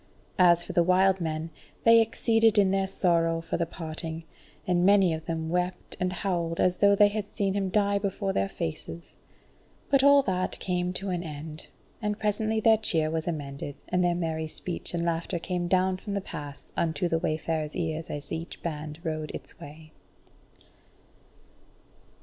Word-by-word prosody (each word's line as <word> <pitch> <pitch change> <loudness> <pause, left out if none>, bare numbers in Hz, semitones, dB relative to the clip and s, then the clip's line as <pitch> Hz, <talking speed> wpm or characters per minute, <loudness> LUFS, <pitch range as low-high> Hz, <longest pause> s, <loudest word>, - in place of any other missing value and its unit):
As 175 -1 +6
for 180 - -7
the 175 - +4
wild 185 +2 +3
men, 160 0 -3 0.3
they 230 0 +7
exceeded 225 0 +2
in 195 -2 +5
their 195 0 +1
sorrow 165 -3 +1
for 165 0 -3
the 170 - -1
parting, 160 -1 -5 0.4
and 175 -1 +2
many 195 -3 +5
of 160 0 -5
them 160 -1 -2
wept 180 +1 -2
and 180 0 0
howled 170 -3 -2
as 180 0 +2
though 200 0 +5
they 205 0 +6
had 205 0 -3
seen 200 -3 -1
him 195 -1 -1
die 200 0 +2
before 195 0 -2
their 95 0 0
faces. 80 +1 -6 0.8
But 275 -1 +4
all 280 0 +7
that 185 -3 -1
came 180 -1 -1
to 195 +1 -3
an 175 -1 -1
end, 155 -1 -7 0.3
and 210 -1 -1
presently 220 +1 0
their 220 0 +5
cheer 160 -7 +1
was 160 0 -2
amended, 145 -3 -4
and 180 0 +2
their 175 -1 +2
merry 160 -2 -2
speech 175 +2 -5
and 170 0 -1
laughter 170 +1 -1
came 175 +1 -2
down 185 +1 +2
from 200 +2 -5
the - - +1
pass 145 -6 -8
unto 165 +1 0
the 165 -1 +1
wayfarers' 155 -1 -2
ears 160 -1 -3
as 145 0 -6
each 165 +1 -6
band 155 -2 -4
rode 155 -2 -3
its - - -10
way. 155 +2 -12
175 Hz, 175 wpm, -27 LUFS, 160-195 Hz, 0.8 s, they